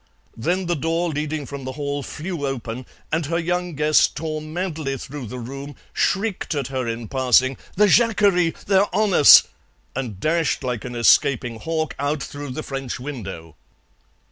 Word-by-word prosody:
Then 180 +11 -1
the 175 0 0
door 165 +3 0
leading 150 -1 -3
from 140 0 -7
the 130 0 -5
hall 145 0 -3
flew 155 0 -4
open 125 -2 -5 0.2
and 155 -1 0
her 165 +2 0
young 175 0 -1
guest 150 +1 +3
tore 155 0 -3
madly 155 -3 -3
through 135 -1 -7
the 125 - -7
room, 135 +4 -7 0.2
shrieked 195 -4 0
at 140 -3 -2
her 130 -2 -2
in 115 0 -4
passing, 130 0 +3 0.2
"The 210 - +5
jacquerie! 200 -6 +3
They're 195 +1 +4
on 210 -1 +2
us!" 145 - +9 0.5
and 120 -8 -4
dashed 160 - 0
like 125 -4 -2
an 125 -1 -6
escaping 120 -1 +3
hawk 160 +1 -2
out 145 +1 -1
through 145 0 -7
the 155 +5 -5
French 135 -3 -5
window. 95 - -7
145 Hz, 165 wpm, -22 LUFS, 130-165 Hz, 0.5 s, us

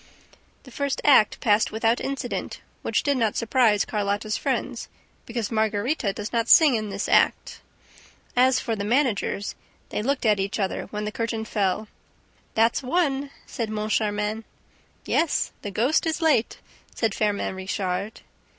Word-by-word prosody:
The 260 - -14
first 280 +2 -2
act 265 -7 +5
passed 210 -1 +3
without 225 +2 +1
incident, 275 -3 -4 0.2
which - - 0
did 285 -2 +1
not 225 -4 +1
surprise 230 -3 +2
Carlotta's 205 0 -1
friends, - - -2 0.4
because 230 -2 -3
Margarita 220 +2 0
does 210 +3 -6
not 230 0 0
sing 310 -5 +7
in 215 -2 -1
this 200 +1 -3
act. - - +2 0.7
As 255 +1 +4
for 230 -3 -2
the 200 - -4
managers, 225 -4 0 0.4
they - - -2
looked 275 +3 -1
at 210 -2 +3
each 195 +2 -2
other, 195 -2 -2
when 210 0 -5
the 210 - -3
curtain 225 0 -3
fell. 210 0 -1 0.7
"That's 225 +1 +3
one!" 280 -1 0 0.2
said 230 -4 -4
Moncharmin. 215 0 -1 0.6
"Yes, 330 - +1
the 205 - -5
ghost 245 - +1
is 320 - -1
late," 310 -9 +2 0.4
said 225 -3 0
Firmin 205 -2 -1
Richard. 190 +2 -3
220 Hz, 145 wpm, -24 LUFS, 210-255 Hz, 0.7 s, sing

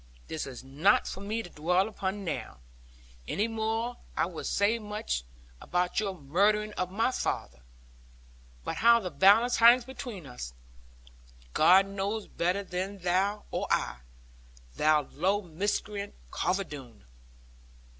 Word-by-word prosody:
This 160 -3 -4
is 130 -2 -8
not 145 +10 +3
for - - -5
me 220 +3 -2
to - - -10
dwell 180 +6 +1
upon 200 -1 -4
now; 165 - -4 0.7
any 210 - 0
more 225 +2 -2 0.2
than - - +2
I - - +2
would 170 -2 -6
say 210 +4 +2
much 210 - -3 0.4
about 180 +2 0
your 200 -3 -2
murdering 210 +9 +2
of 180 -2 -2
my 225 +6 +1
father. - - -3 1.0
But - - -4
how 235 +1 +6
the 185 -5 -5
balance 205 - +5
hangs 235 +1 +7
between 240 - -7
us, 125 - -8 1.0
God 190 +2 +6
knows 200 +2 -3
better 180 +4 -1
than 190 +2 -4
thou 195 +3 0
or - - -2
I, - - 0 0.8
thou 155 -1 +3
low 190 +9 0
miscreant, 200 +4 -3 0.2
Carver 185 +3 0
Doone.' 130 - -11
195 Hz, 135 wpm, -29 LUFS, 170-210 Hz, 1.0 s, hangs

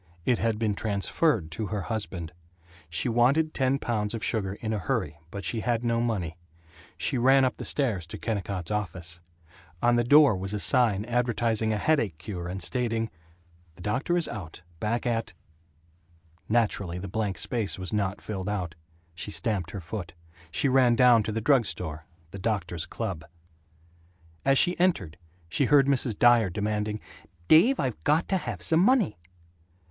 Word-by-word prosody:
It 125 - +2
had 115 -2 0
been 110 -2 0
transferred 100 - 0
to 105 +7 -3
her 105 0 -3
husband. 95 -7 -4 0.6
She 80 +9 -1
wanted 130 +7 +3
ten 135 0 +1
pounds 110 -4 -2
of 110 - -5
sugar 100 -4 -1
in 110 +1 -4
a 105 - -1
hurry, 75 -4 -2
but 100 +3 -7
she 115 - -1
had 120 +1 -1
no 115 -1 +1
money. 95 -8 -2 0.6
She 130 - 0
ran 135 +2 +5
up 130 - -1
the - - -6
stairs 110 - 0
to - - -7
Kennicott's 100 -4 -3
office. 85 -4 -3 0.6
On 120 +3 +3
the 120 - +3
door 145 -1 +6
was 95 +2 -4
a - - -2
sign 110 -3 +2
advertising 115 -2 0
a 105 - 0
headache 110 - +1
cure 85 +1 -6
and 95 0 -3
stating, 115 0 -1 0.6
"The 90 - -12
doctor 135 +11 0
is 170 - +1
out, 90 -5 -8 0.2
back 115 +5 -1
at 115 -2 -1 0.6
" 85 -1 -34
Naturally, 100 -6 -2
the 95 +2 -6
blank 100 0 -2
space 110 -5 0
was 95 0 -4
not 100 -2 -1
filled 100 -2 -4
out. 90 -5 -3 0.4
She 90 - -5
stamped 100 -5 -1
her 100 - -6
foot. 90 -1 -7 0.3
She 110 - +1
ran 130 -2 +4
down 120 -1 +6
to 110 - -3
the 110 +1 -2
drug 125 -2 +3
store 80 -2 -5 0.2
the 100 - -8
doctor's 90 -5 -2
club. 80 - -4 1.2
As 135 0 +4
she 175 +5 +5
entered 95 - +1 0.3
she 135 - +1
heard 140 +1 +5
Mrs. 130 -6 0
Dyer 120 -4 +5
demanding, 105 +2 -2 0.5
"Dave, 210 - +6
I've 120 - -2
got 155 +3 +2
to 190 - +2
have 120 - -5
some 160 - +3
money." 200 - +3
110 Hz, 170 wpm, -27 LUFS, 95-120 Hz, 1.2 s, door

